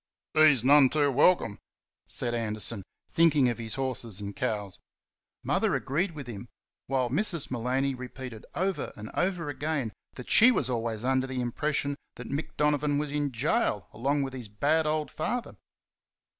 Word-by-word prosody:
"He's 150 -6 +5
none 140 0 +7
too 145 -1 +2
welcome," 140 - +3 0.5
said 120 -1 -1
Anderson, 110 -2 0 0.3
thinking 150 -6 +4
of 120 - -3
his 115 -2 -3
horses 125 -6 -2
and 100 0 -6
cows. 105 -8 -3 0.6
Mother - - +1
agreed 170 +7 -1
with 145 -3 -7
him, 115 -1 -8 0.4
while 130 -3 0
Mrs. 170 -2 +1
Maloney 130 +3 0
repeated 125 -2 -8
over 190 +1 -1
and 110 -1 -9
over 180 -3 -1
again 145 -6 -2 0.2
that 125 - -9
she 230 - +8
was 130 - +1
always 115 -2 -2
under 130 0 +1
the 130 -1 -4
impression 140 +3 -1 0.2
that 125 +1 -8
Mick 155 +3 -4
Donovan 150 -1 +2
was 145 0 -2
in 145 -1 -1
gaol 115 -4 0
along 140 +5 0
with 135 -1 -5
his 125 -4 -6
bad 150 +10 +1
old 155 0 -1
father. 245 -1 -3
135 Hz, 155 wpm, -28 LUFS, 120-150 Hz, 0.6 s, she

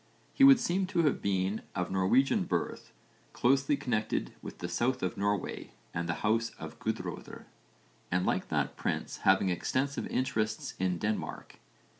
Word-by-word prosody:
He 275 - +3
would 275 -2 +9
seem 185 -2 0
to 175 -3 +1
have 145 - +2
been 95 +1 0
of 90 -2 -2
Norwegian 95 +9 +3
birth, - - -3 0.4
closely 135 +3 +3
connected 115 -6 -1
with - - -8
the 85 - -4
south 120 +9 0
of 90 - -1
Norway 100 -1 -2 0.2
and 85 0 -2
the 80 - +1
house 115 +2 +2
of - - -9
Guðröðr, - - -4 0.6
but 90 0 +1
like - - 0
that - - -1
prince - - -2
having 95 0 +3
extensive 135 +10 -1
interests 110 -4 -1
in 90 -1 +1
Denmark. 110 +3 -4
110 Hz, 150 wpm, -31 LUFS, 95-135 Hz, 0.6 s, would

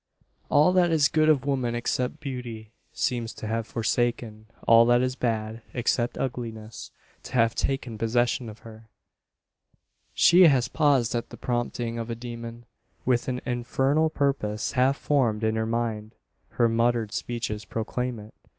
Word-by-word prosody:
All 155 +5 +4
that 180 -2 +4
is 155 -4 +3
good 155 +1 +3
of 145 -3 +3
woman, 130 -4 -1
except 125 +4 -2
beauty, 120 -6 -7 0.2
seems 120 -2 -2
to - - -8
have 110 +1 -2
forsaken 115 -2 -2 0.2
all 115 0 +8
that 120 +1 +4
is 130 0 -1
bad, 110 -2 -2
except 120 0 0
ugliness, 115 -4 -5 0.3
to - - -11
have 115 -2 +3
taken 130 -5 -2
possession 120 +1 0
of 110 - -12
her! 110 0 -13 1.3
She 175 +1 +7
has 130 -5 +3
paused 135 -4 +2
at 120 0 -3
the - - -11
prompting 120 -1 -2
of 115 0 -5
a 115 - -3
demon 115 0 -8 0.4
with 125 -2 +1
an 125 -1 -2
infernal 135 +5 +1
purpose 135 -8 -1
half 135 +1 +2
formed 120 -7 +1
in 110 0 +1
her 110 0 -1
mind. 115 -2 -3 0.3
Her 120 - +2
muttered 115 -1 +1
speeches 110 -3 -4
proclaim 120 +4 -3
it. 105 +1 -12
120 Hz, 150 wpm, -26 LUFS, 115-130 Hz, 1.3 s, all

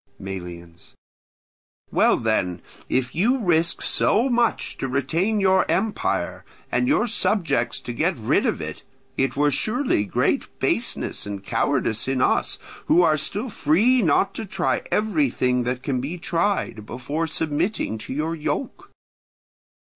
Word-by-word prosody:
Melians. 85 -3 -9 1.0
Well - - +4
then, 90 -6 -1 0.3
if 125 -1 0
you 230 +10 +2
risk 170 -7 +1
so 240 +5 +2
much 240 -1 +1
to 135 - -2
retain 165 - 0
your 190 -1 +4
empire, 210 +2 -1 0.3
and 250 - +1
your 285 -3 +3
subjects 165 - 0
to 120 - -6
get 165 +8 0
rid 110 - +1
of - - -1
it, - - -6 0.3
it 135 0 0
were 145 +1 +3
surely 215 - +1
great - - -1
baseness - - -1
and 100 -1 -5
cowardice 115 0 0
in 135 -1 0
us - - +1 0.3
who 175 - +5
are 155 - +4
still 205 - -3
free 210 - +3
not 175 +1 +2
to 225 - -5
try 190 -2 0
everything 135 - +1
that 125 +1 -2
can 130 -3 -1
be 150 +7 -4
tried, 170 - -1
before 145 +7 -3
submitting 160 - -1
to 105 - -8
your 155 +4 -1
yoke. 275 - -4
155 Hz, 140 wpm, -23 LUFS, 125-200 Hz, 1.0 s, who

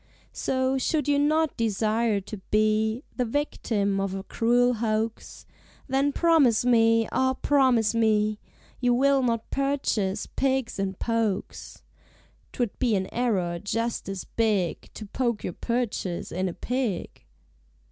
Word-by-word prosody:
So, 260 0 0
should 295 +2 0
you 285 -1 +3
not 310 +2 +2
desire 220 -1 +1
to 210 +3 -8
be 215 +3 +1
The 250 - +2
victim 225 -6 -1
of 195 -1 -2
a 195 - -5
cruel 245 +3 +2
hoax, 220 0 -3 0.4
Then 270 +1 +1
promise 285 -9 +3
me, 230 -2 +4
ah! 260 0 +1
promise 255 -7 +2
me, 215 -2 +2 0.4
You 245 -1 +2
will 275 +1 +3
not 230 -3 -1
purchase 265 -8 -1
pigs 265 -5 -1
in 195 0 -2
pokes! 225 -2 -3 0.7
('Twould 240 -5 -3
be 240 -5 +2
an 190 -1 -3
error 190 -8 0
just 230 +3 -3
as 195 -2 -4
big 210 -7 -1
To 215 - -7
poke 235 +1 -2
your 180 - -3
purchase 230 -7 -3
in 185 +2 -1
a - - -6
pig.) 250 -4 -3
230 Hz, 135 wpm, -26 LUFS, 210-260 Hz, 0.7 s, me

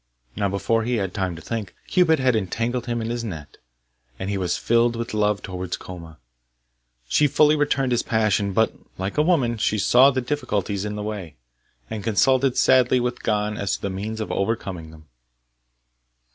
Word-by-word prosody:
Now, 100 -1 0
before 100 +4 0
he 120 +2 0
had 95 -4 -2
time 95 -3 -2
to 80 - -11
think, 110 -6 -5
Cupid 170 -4 +3
had 130 -3 +2
entangled 115 +5 -2
him 120 -1 -2
in 115 - -3
his 120 0 -3
net, 80 -10 -7 0.6
and 95 +1 -4
he - - -1
was 90 -2 -1
filled 120 0 +2
with 115 0 -4
love 105 -1 +1
towards 90 -1 -4
Koma. 85 -3 -10 0.9
She 150 - +3
fully 150 +2 +4
returned 135 -3 +1
his 120 -1 +2
passion, 105 -3 +1
but, 110 +4 +2 0.2
like 95 +9 -3
a - - +6
woman, 140 -9 +2
she 105 0 0
saw 125 +6 +6
the 130 -1 -1
difficulties 105 -7 -2
in 105 0 -4
the 105 - -4
way, 100 -8 -6 0.5
and 110 -2 -5
consulted 130 +4 +2
sadly 130 -1 +4
with 120 0 -2
Gon 105 -1 -1
as 100 - -1
to - - -10
the 100 - -2
means 105 +4 -4
of 110 - -4
overcoming 95 -6 -2
them. 80 -1 -15
110 Hz, 185 wpm, -23 LUFS, 95-120 Hz, 0.9 s, a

